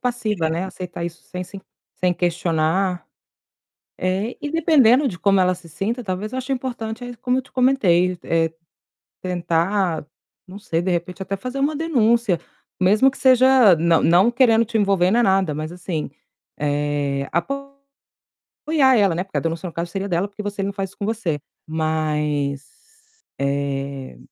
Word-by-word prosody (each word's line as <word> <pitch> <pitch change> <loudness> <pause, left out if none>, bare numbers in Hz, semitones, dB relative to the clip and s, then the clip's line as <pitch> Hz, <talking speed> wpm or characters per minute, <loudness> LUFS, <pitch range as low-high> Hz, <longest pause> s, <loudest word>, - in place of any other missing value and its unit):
passiva, 215 -9 -1
né. 170 +3 -2
Aceitar 180 -2 -6
isso 170 -1 -7
sem 180 0 -6
se 195 +2 -10 0.4
sem 180 -1 +1
questionar. 175 +1 0 0.9
É, 190 +6 -1
e 295 - -3
dependendo 290 -5 +4
de 175 -7 -6
como 195 -1 +3
ela 185 0 +3
se 175 -1 -15
sinta, 225 - -3
talvez 200 +3 -4
eu 260 - -3
ache 260 +1 -4
importante 245 -2 -5
aí 245 0 -7
como 250 +2 0
eu - - 0
te 255 - -22
comentei, 185 -9 +3
é 165 -1 +1 0.7
tentar 175 -1 0 0.4
não 185 +2 -10
sei, 165 -5 -1
de 185 - -2
repente 180 +2 -3
até 195 +1 -3
fazer 255 +6 -5
uma 290 +2 +1
denúncia, 235 - +2 0.4
mesmo 210 +8 +4
que - - -13
seja 255 -5 +6
não 165 +1 +3
não 185 +8 +5
querendo 230 -2 +4
te 225 +1 -2
envolver 195 -3 +2
nem 240 +3 +4
nada, 190 -5 +2
mas, 155 +2 -4
assim, 175 -4 -4 0.5
eh, 145 -1 -1
apoiar 275 +9 -4 1.0
ela, 195 -6 +3
né, 180 - -1
porque 195 - -5
a - - +1
denúncia 165 +2 -3
no 170 - -8
caso 170 +1 -3
seria 195 +1 -3
dela, 175 +3 0
porque 205 +1 -9
você 205 -1 -4
não 200 - -1
faz 195 -1 -3
isso - - -24
com 200 - -2
você. 200 -9 -2 0.3
Mas, 150 -3 -1 0.7
eh, 140 - -3
185 Hz, 165 wpm, -21 LUFS, 165-230 Hz, 1.0 s, seja